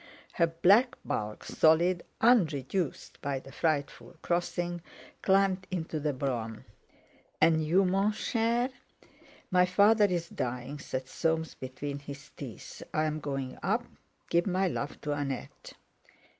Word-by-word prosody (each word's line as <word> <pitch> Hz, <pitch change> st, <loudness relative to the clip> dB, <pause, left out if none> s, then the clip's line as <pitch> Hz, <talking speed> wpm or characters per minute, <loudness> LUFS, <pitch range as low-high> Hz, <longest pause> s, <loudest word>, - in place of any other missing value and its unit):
Her 170 Hz, -, +3 dB
black 200 Hz, +10 st, +4 dB
bulk, 105 Hz, 0 st, -3 dB
solid, 170 Hz, +3 st, +3 dB, 0.2 s
unreduced 175 Hz, -, +1 dB
by 140 Hz, -1 st, -1 dB
the 135 Hz, +1 st, -10 dB
frightful 155 Hz, +3 st, -1 dB
crossing, 175 Hz, 0 st, -1 dB, 0.4 s
climbed 190 Hz, -1 st, +3 dB
into 165 Hz, -3 st, -3 dB
the 150 Hz, 0 st, 0 dB
brougham. 120 Hz, -5 st, -3 dB, 0.7 s
"And 160 Hz, -1 st, +4 dB
you, 180 Hz, +5 st, +3 dB
mon 195 Hz, +3 st, +2 dB
cher?" 235 Hz, +3 st, 0 dB, 0.8 s
"My 180 Hz, 0 st, +5 dB
father's 200 Hz, -3 st, +4 dB
dying," 130 Hz, -, -4 dB
said 130 Hz, -2 st, -4 dB
Soames 160 Hz, +2 st, -1 dB
between 140 Hz, +2 st, -6 dB
his 140 Hz, -1 st, -10 dB
teeth. -, -, -9 dB
"I'm 155 Hz, 0 st, 0 dB
going 135 Hz, -3 st, -4 dB
up. 225 Hz, +6 st, 0 dB, 0.4 s
Give 170 Hz, +2 st, +2 dB
my 190 Hz, +1 st, +2 dB
love 145 Hz, -4 st, -3 dB
to 150 Hz, -, -3 dB
Annette." 140 Hz, -3 st, -4 dB
165 Hz, 120 wpm, -30 LUFS, 140-190 Hz, 0.8 s, My